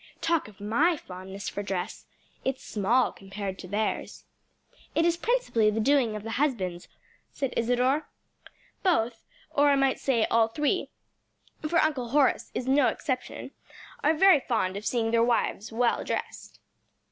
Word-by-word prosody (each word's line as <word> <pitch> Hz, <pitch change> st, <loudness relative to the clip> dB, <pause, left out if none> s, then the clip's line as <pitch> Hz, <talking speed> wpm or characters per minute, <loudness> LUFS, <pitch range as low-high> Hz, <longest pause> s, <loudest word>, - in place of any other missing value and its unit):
Talk 335 Hz, -5 st, +1 dB
of 210 Hz, -2 st, -16 dB
my 285 Hz, -, +2 dB
fondness 190 Hz, -2 st, -8 dB
for 205 Hz, -, -3 dB
dress! 190 Hz, -3 st, -4 dB, 0.4 s
It's 265 Hz, 0 st, -2 dB
small 225 Hz, +5 st, +1 dB
compared 195 Hz, 0 st, -6 dB
to 180 Hz, -, -8 dB
theirs." 210 Hz, +3 st, -2 dB, 0.7 s
"It 330 Hz, -, +3 dB
is 340 Hz, 0 st, +3 dB
principally 390 Hz, -, +1 dB
the 215 Hz, +1 st, -1 dB
doing 245 Hz, -2 st, +2 dB
of 210 Hz, -, -6 dB
the 225 Hz, -, -5 dB
husbands," 185 Hz, -12 st, -1 dB, 0.4 s
said 270 Hz, -3 st, -3 dB
Isadore. 250 Hz, +5 st, +1 dB, 0.7 s
"Both 240 Hz, -, 0 dB, 0.2 s
or 290 Hz, 0 st, +4 dB
I 280 Hz, -, +5 dB
might 270 Hz, -1 st, +2 dB
say 240 Hz, -5 st, +2 dB
all 225 Hz, -1 st, +4 dB
three, 300 Hz, -, -1 dB, 0.8 s
for 335 Hz, -, +2 dB
Uncle 275 Hz, -7 st, +1 dB
Horace 280 Hz, +1 st, +2 dB
is 255 Hz, -, -3 dB
no 270 Hz, 0 st, +4 dB
exception 260 Hz, -6 st, -3 dB, 0.5 s
are 310 Hz, +2 st, +4 dB
very 380 Hz, -1 st, +6 dB
fond 220 Hz, -8 st, -1 dB
of 205 Hz, +2 st, -4 dB
seeing 225 Hz, -2 st, 0 dB
their 230 Hz, 0 st, +4 dB
wives 230 Hz, -2 st, 0 dB
well 235 Hz, +1 st, +1 dB
dressed." -, -, -5 dB
240 Hz, 150 wpm, -27 LUFS, 215-290 Hz, 0.8 s, very